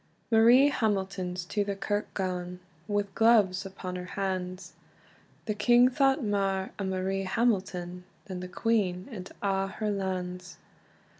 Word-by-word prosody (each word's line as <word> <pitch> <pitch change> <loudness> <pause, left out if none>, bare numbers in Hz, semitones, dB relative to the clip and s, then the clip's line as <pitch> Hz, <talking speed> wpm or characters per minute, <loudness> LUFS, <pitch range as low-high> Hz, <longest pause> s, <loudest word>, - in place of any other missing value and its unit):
Marie 240 +5 +7
Hamilton's 190 -6 -1
to 205 +3 -1
the 200 0 -3
kirk 205 +2 -2
gane, 180 -2 -3 0.3
Wi 205 -1 0
gloves 210 -4 +4
upon 185 -1 -7
her 180 - -6
hands; 185 -2 -3 0.7
The 215 - -1
king 240 +4 +5
thought 270 +1 +2
mair 195 -2 0
o - - -1
Marie 190 +1 -1
Hamilton, 185 -4 -1 0.2
Than 185 -3 -6
the 180 - -6
queen 185 -2 0
and 190 -4 -8
a' 195 -1 +1
her 210 +2 -3
lands. 185 -2 -4
195 Hz, 135 wpm, -29 LUFS, 185-215 Hz, 0.7 s, Marie